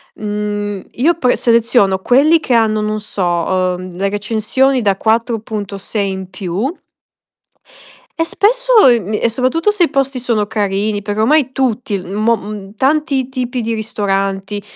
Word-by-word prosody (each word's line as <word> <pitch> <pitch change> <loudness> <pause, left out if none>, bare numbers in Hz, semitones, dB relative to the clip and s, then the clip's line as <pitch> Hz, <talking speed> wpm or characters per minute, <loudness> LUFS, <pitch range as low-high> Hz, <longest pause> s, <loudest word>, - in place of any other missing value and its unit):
Mhmm, 205 -1 -4
io 320 +8 +2
poi 250 -5 +2
seleziono 230 -5 +2
quelli 285 +10 +4
che 265 - -1
hanno, 220 -2 +2
non 215 0 -2
so, 205 -2 -4
uhm, 180 +1 -1
le 195 +1 0
recensioni 225 +6 0
da 200 -3 +1
4.6 215 -3 -2
in 190 -1 -6
più 195 - -3 1.4
e 330 - +1
spesso 485 - +3
ehm, 225 -5 +3
e - - +2
soprattutto 260 - +1
se 385 -4 +2
i - - +1
posti 275 -1 -1
sono 230 -4 0
carini, 205 0 -1
perché 205 +1 -3
ormai 275 +4 +3
tutti, 245 -5 -1
mo 215 +5 0
mhmm, 205 0 -8
tanti 275 0 +1
tipi 250 -1 -3
di 230 0 -2
ristoranti, 195 -2 -2
220 Hz, 140 wpm, -16 LUFS, 200-255 Hz, 1.4 s, quelli